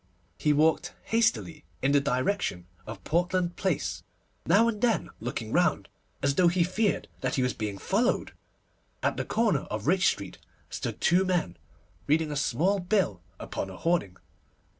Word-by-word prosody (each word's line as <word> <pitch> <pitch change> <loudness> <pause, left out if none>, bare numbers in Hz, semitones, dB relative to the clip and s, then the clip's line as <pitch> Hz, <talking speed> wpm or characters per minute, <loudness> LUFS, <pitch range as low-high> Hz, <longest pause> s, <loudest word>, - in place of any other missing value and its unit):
He 150 - +2
walked 155 +2 +2
hastily 225 -9 0 0.2
in 135 - +3
the 145 0 +4
direction 130 - -1 0.2
of 105 -4 -8
Portland 175 +1 0
Place, 190 -6 -1 0.5
now 205 +7 +5
and 215 -3 -2
then 230 -8 +1
looking - - -4
round, - - +2 0.3
as 140 0 +3
though 175 +4 +4
he 175 0 +3
feared 200 +4 0
that 130 -1 -1
he 130 - +1
was 125 - 0
being 105 -2 -4
followed. 220 - 0 0.7
At - - +1
the - - -3
corner 225 -3 +1
of 105 0 -4
Rich 185 +4 +3
Street 100 -2 -2 0.3
stood - - -4
two 180 +3 +4
men, 175 - 0 0.5
reading 155 0 +2
a - - -3
small 150 +8 +1
bill 180 - 0 0.2
upon 95 - -4
a 95 - -9
hoarding. 165 - 0
165 Hz, 160 wpm, -28 LUFS, 130-190 Hz, 0.7 s, now